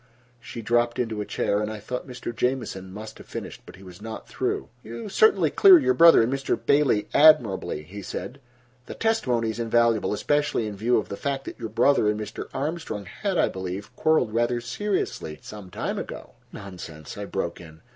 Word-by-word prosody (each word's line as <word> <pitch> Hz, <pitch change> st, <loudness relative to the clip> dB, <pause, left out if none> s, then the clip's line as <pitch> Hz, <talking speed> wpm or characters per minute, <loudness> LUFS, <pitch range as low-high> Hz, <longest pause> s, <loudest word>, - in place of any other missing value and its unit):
She 115 Hz, -1 st, -8 dB
dropped 120 Hz, +2 st, +1 dB
into 115 Hz, -4 st, -2 dB
a 105 Hz, -, -5 dB
chair, 100 Hz, +1 st, 0 dB
and 105 Hz, -, -2 dB
I 110 Hz, -, -6 dB
thought 125 Hz, +6 st, -5 dB
Mr. 125 Hz, -2 st, -6 dB
Jamieson 120 Hz, -8 st, -2 dB
must 105 Hz, +2 st, -9 dB
have -, -, -13 dB
finished. -, -, -7 dB
But -, -, -11 dB
he 95 Hz, -, -15 dB
was 90 Hz, 0 st, -12 dB
not 110 Hz, 0 st, -7 dB
through. -, -, -2 dB
"You 115 Hz, -, -7 dB
certainly 440 Hz, -, +4 dB
clear 385 Hz, -2 st, +8 dB
your 275 Hz, -, +2 dB
brother 165 Hz, -1 st, +7 dB
and 120 Hz, +4 st, 0 dB
Mr. 135 Hz, 0 st, -1 dB
Bailey 140 Hz, -7 st, +2 dB
admirably," 120 Hz, -, +4 dB
he 100 Hz, +6 st, -9 dB
said. 130 Hz, +7 st, -7 dB, 0.5 s
"The -, -, -7 dB
testimony 125 Hz, -, 0 dB
is 110 Hz, -, -8 dB
invaluable, 115 Hz, -1 st, +2 dB
especially 145 Hz, +2 st, 0 dB
in 105 Hz, -1 st, -5 dB
view 115 Hz, +4 st, +2 dB
of 110 Hz, -, -2 dB
the 100 Hz, -, -5 dB
fact 135 Hz, -1 st, -3 dB
that -, -, -8 dB
your 115 Hz, -2 st, -5 dB
brother 115 Hz, 0 st, +3 dB
and 105 Hz, 0 st, -1 dB
Mr. 105 Hz, -, -6 dB
Armstrong 145 Hz, -8 st, -4 dB
had, 195 Hz, -, -3 dB
I -, -, +4 dB
believe, 95 Hz, +1 st, -6 dB
quarreled 155 Hz, -9 st, +2 dB
rather 120 Hz, +1 st, +1 dB
seriously 120 Hz, -, -3 dB
some 105 Hz, -3 st, -10 dB
time -, -, -3 dB
ago." -, -, -8 dB, 0.2 s
"Nonsense," 90 Hz, -6 st, -9 dB
I 105 Hz, -, -5 dB
broke 85 Hz, -4 st, -4 dB
in. 80 Hz, -1 st, -14 dB
115 Hz, 195 wpm, -25 LUFS, 100-135 Hz, 0.5 s, clear